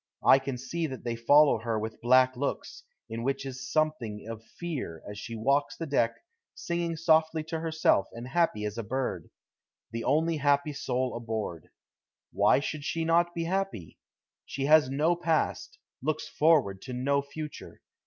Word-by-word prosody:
I 135 Hz, -, +8 dB
can 135 Hz, -1 st, -4 dB
see 165 Hz, +6 st, -3 dB
that 130 Hz, -3 st, -8 dB
they 120 Hz, -1 st, -2 dB
follow 145 Hz, +3 st, +5 dB
her 115 Hz, 0 st, -2 dB
with 110 Hz, +1 st, -5 dB
black 130 Hz, +2 st, +5 dB
looks, 140 Hz, -, -4 dB, 0.3 s
in 115 Hz, +1 st, -5 dB
which 135 Hz, +2 st, -2 dB
is 125 Hz, -1 st, -6 dB
something 135 Hz, -10 st, -1 dB
of 115 Hz, -1 st, -7 dB
fear, 130 Hz, -, -6 dB
as 105 Hz, 0 st, -7 dB
she 115 Hz, -, -6 dB
walks 140 Hz, +6 st, +1 dB
the 165 Hz, -, -4 dB
deck, 120 Hz, -6 st, +1 dB, 0.4 s
singing 170 Hz, -1 st, -2 dB
softly 160 Hz, -1 st, +2 dB
to 160 Hz, +1 st, -4 dB
herself 160 Hz, -11 st, +2 dB
and 120 Hz, +2 st, -8 dB
happy 135 Hz, -8 st, +1 dB
as 105 Hz, +2 st, -4 dB
a -, -, -3 dB
bird 110 Hz, -7 st, -3 dB, 0.6 s
the 115 Hz, 0 st, -4 dB
only 160 Hz, +3 st, +2 dB
happy 145 Hz, +1 st, +2 dB
soul 130 Hz, -2 st, -2 dB
aboard. 110 Hz, -8 st, -4 dB, 0.6 s
Why -, -, +4 dB
should 150 Hz, +1 st, -4 dB
she 165 Hz, +2 st, -2 dB
not 170 Hz, +1 st, +2 dB
be 170 Hz, -, -1 dB
happy? 180 Hz, -, -3 dB, 0.4 s
She 135 Hz, 0 st, -4 dB
has 150 Hz, -2 st, +6 dB
no 155 Hz, +6 st, +2 dB
past, 170 Hz, +7 st, -1 dB, 0.2 s
looks 155 Hz, +2 st, -2 dB
forward 145 Hz, -12 st, +2 dB
to 130 Hz, -, -7 dB
no 140 Hz, +3 st, +1 dB
future. 150 Hz, +2 st, -8 dB
140 Hz, 165 wpm, -28 LUFS, 115-160 Hz, 0.6 s, I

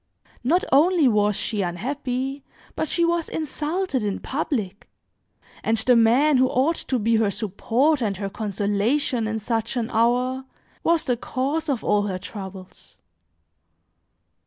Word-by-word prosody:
Not 335 Hz, +9 st, +2 dB
only 315 Hz, +2 st, +5 dB
was 210 Hz, -3 st, +2 dB
she 210 Hz, 0 st, -1 dB
unhappy, 260 Hz, +8 st, -3 dB, 0.3 s
but 315 Hz, -, -2 dB
she 340 Hz, -, +2 dB
was 335 Hz, -1 st, 0 dB
insulted 310 Hz, 0 st, -2 dB
in 205 Hz, -2 st, -1 dB
public, 215 Hz, -8 st, -3 dB, 0.7 s
and 225 Hz, -, +1 dB
the 245 Hz, +3 st, +4 dB
man 250 Hz, +6 st, +4 dB
who 260 Hz, 0 st, +4 dB
ought 270 Hz, +6 st, +1 dB
to 260 Hz, -, +1 dB
be 230 Hz, 0 st, +2 dB
her 220 Hz, -2 st, +2 dB
support 235 Hz, -, 0 dB
and 205 Hz, -4 st, -1 dB
her 200 Hz, 0 st, -3 dB
consolation 215 Hz, +5 st, -1 dB
in 220 Hz, 0 st, -2 dB
such 225 Hz, +2 st, -2 dB
an 230 Hz, -2 st, -2 dB
hour, 250 Hz, +3 st, +1 dB, 0.4 s
was 335 Hz, -1 st, +2 dB
the 245 Hz, -2 st, 0 dB
cause 285 Hz, +7 st, -2 dB
of 260 Hz, -6 st, -1 dB
all 205 Hz, 0 st, +2 dB
her 185 Hz, -2 st, -2 dB
troubles. 190 Hz, -1 st, -10 dB
245 Hz, 140 wpm, -23 LUFS, 210-285 Hz, 0.7 s, only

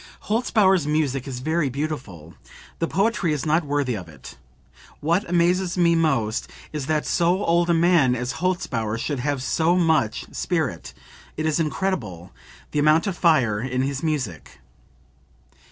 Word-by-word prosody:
"Holzbauer's 205 Hz, -, +2 dB
music 145 Hz, -3 st, 0 dB
is 125 Hz, -2 st, -5 dB
very 155 Hz, 0 st, 0 dB
beautiful; 125 Hz, -, -5 dB, 0.5 s
the 165 Hz, -, 0 dB
poetry 195 Hz, -3 st, +1 dB
is 150 Hz, -, -3 dB
not 160 Hz, +2 st, +2 dB
worthy 145 Hz, -3 st, -1 dB
of 90 Hz, -5 st, -8 dB
it. 70 Hz, -5 st, -12 dB, 0.6 s
What 170 Hz, +5 st, 0 dB
amazes 175 Hz, +1 st, +1 dB
me 170 Hz, -1 st, +4 dB
most 135 Hz, -10 st, 0 dB, 0.2 s
is 145 Hz, -3 st, -4 dB
that 155 Hz, -1 st, 0 dB
so 180 Hz, +3 st, +1 dB
old 170 Hz, +1 st, +2 dB
a 170 Hz, -, +4 dB
man 165 Hz, -7 st, +4 dB
as 125 Hz, 0 st, -3 dB
Holzbauer 120 Hz, -12 st, -1 dB
should 140 Hz, +3 st, -3 dB
have 140 Hz, 0 st, -2 dB
so 165 Hz, +5 st, +2 dB
much 160 Hz, -11 st, +1 dB
spirit, -, -, -2 dB, 0.4 s
it 155 Hz, -, -2 dB
is 155 Hz, +1 st, +1 dB
incredible, 140 Hz, -, -2 dB, 0.4 s
the 150 Hz, -, 0 dB
amount 155 Hz, +2 st, +4 dB
of 195 Hz, -3 st, -2 dB
fire 130 Hz, -, +3 dB
in 130 Hz, +1 st, -1 dB
his 140 Hz, 0 st, -2 dB
music." 135 Hz, -, -3 dB
155 Hz, 150 wpm, -23 LUFS, 130-170 Hz, 0.6 s, me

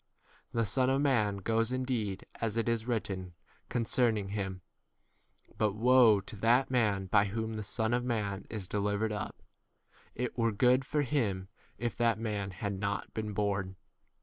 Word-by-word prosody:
The 115 Hz, -1 st, +1 dB
Son 130 Hz, +5 st, +2 dB
of 135 Hz, +1 st, +2 dB
man 115 Hz, -8 st, +2 dB
goes 115 Hz, +4 st, +1 dB
indeed 125 Hz, -7 st, -2 dB, 0.2 s
as 115 Hz, -1 st, -1 dB
it 115 Hz, -, +1 dB
is 115 Hz, 0 st, 0 dB
written 95 Hz, -7 st, -3 dB, 0.3 s
concerning 115 Hz, -3 st, +1 dB
him, 95 Hz, -2 st, -3 dB, 1.0 s
but 105 Hz, -2 st, +2 dB
woe 120 Hz, -2 st, +6 dB
to 100 Hz, -, -7 dB
that 120 Hz, +6 st, +3 dB
man 105 Hz, -6 st, +2 dB
by 100 Hz, +2 st, +4 dB
whom 110 Hz, +2 st, -3 dB
the 110 Hz, -, -4 dB
Son 110 Hz, +3 st, -1 dB
of 120 Hz, 0 st, +1 dB
man 105 Hz, -5 st, -2 dB
is 105 Hz, -5 st, -4 dB
delivered 105 Hz, +2 st, 0 dB
up: 105 Hz, -1 st, -5 dB, 0.7 s
it 125 Hz, 0 st, -3 dB
were 115 Hz, -1 st, +2 dB
good 125 Hz, +5 st, +3 dB
for 150 Hz, +2 st, 0 dB
him 105 Hz, -9 st, -1 dB, 0.3 s
if 120 Hz, -1 st, -2 dB
that 115 Hz, -1 st, +3 dB
22 110 Hz, -, -8 dB
man 105 Hz, -3 st, -2 dB
had 100 Hz, +1 st, -4 dB
not 100 Hz, 0 st, -3 dB
been 110 Hz, -1 st, -3 dB
born. 100 Hz, -2 st, -1 dB
110 Hz, 165 wpm, -31 LUFS, 100-120 Hz, 1.0 s, woe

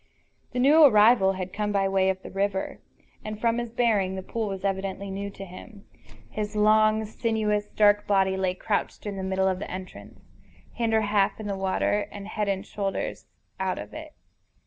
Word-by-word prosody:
The 250 Hz, -, -6 dB
new 290 Hz, +6 st, +6 dB
arrival 215 Hz, -6 st, +6 dB
had 185 Hz, -1 st, -5 dB
come 210 Hz, 0 st, -1 dB
by 195 Hz, -1 st, +2 dB
way 190 Hz, 0 st, +2 dB
of 190 Hz, 0 st, -2 dB
the -, -, -9 dB
river, 195 Hz, 0 st, -2 dB, 0.4 s
and, 215 Hz, 0 st, -6 dB
from 230 Hz, +1 st, +1 dB
his 240 Hz, -1 st, -4 dB
bearing, 220 Hz, -5 st, +1 dB
the 190 Hz, -, -5 dB
pool 225 Hz, +2 st, -3 dB
was 195 Hz, -1 st, -5 dB
evidently 195 Hz, 0 st, -2 dB
new 200 Hz, +1 st, -4 dB
to 195 Hz, 0 st, -9 dB
him. 200 Hz, +3 st, -12 dB, 0.4 s
His 210 Hz, -, -5 dB
long, 215 Hz, +1 st, +4 dB
sinuous, 215 Hz, -1 st, -1 dB
dark 205 Hz, 0 st, +3 dB
body 190 Hz, -1 st, +2 dB
lay 190 Hz, -1 st, -1 dB
crouched 205 Hz, +3 st, -2 dB
in 205 Hz, -1 st, -4 dB
the 190 Hz, -, -5 dB
middle 190 Hz, 0 st, 0 dB
of 185 Hz, -1 st, 0 dB
the -, -, -6 dB
entrance, 185 Hz, 0 st, -9 dB, 0.5 s
hinder 225 Hz, -2 st, +1 dB
half 205 Hz, -1 st, +1 dB
in 215 Hz, -, -6 dB
the 200 Hz, -1 st, -2 dB
water 195 Hz, +2 st, 0 dB
and 200 Hz, -1 st, -8 dB
head 215 Hz, -1 st, -2 dB
and 195 Hz, -1 st, -1 dB
shoulders 195 Hz, -2 st, -4 dB, 0.3 s
out 190 Hz, -1 st, -1 dB
of -, -, -8 dB
it. 310 Hz, 0 st, -9 dB
205 Hz, 190 wpm, -26 LUFS, 190-215 Hz, 0.5 s, new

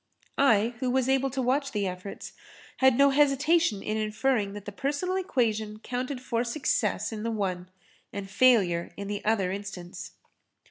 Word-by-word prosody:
I, 230 Hz, -4 st, +4 dB
who 255 Hz, -, -1 dB
was 260 Hz, 0 st, +1 dB
able 270 Hz, 0 st, +2 dB
to 265 Hz, 0 st, -2 dB
watch 275 Hz, +3 st, 0 dB
the 205 Hz, -2 st, 0 dB
efforts, 185 Hz, +1 st, -6 dB, 0.4 s
had 265 Hz, -2 st, +4 dB
no 280 Hz, 0 st, +6 dB
hesitation 290 Hz, -3 st, +3 dB
in 215 Hz, +1 st, -2 dB
inferring 215 Hz, -1 st, 0 dB
that 205 Hz, -1 st, -8 dB
the 205 Hz, -, -5 dB
personal 285 Hz, -, -2 dB
equation 220 Hz, -, -1 dB
counted 250 Hz, +4 st, -4 dB
for 235 Hz, -2 st, -1 dB
success 235 Hz, -5 st, -1 dB
in 215 Hz, -1 st, -5 dB
the 230 Hz, -, -2 dB
one 185 Hz, -5 st, -3 dB, 0.4 s
and 200 Hz, -1 st, -5 dB
failure 195 Hz, -6 st, +3 dB
in 200 Hz, -, -5 dB
the 205 Hz, 0 st, -4 dB
other 205 Hz, -4 st, +1 dB
instance. 185 Hz, -2 st, -7 dB
225 Hz, 165 wpm, -27 LUFS, 200-265 Hz, 0.4 s, no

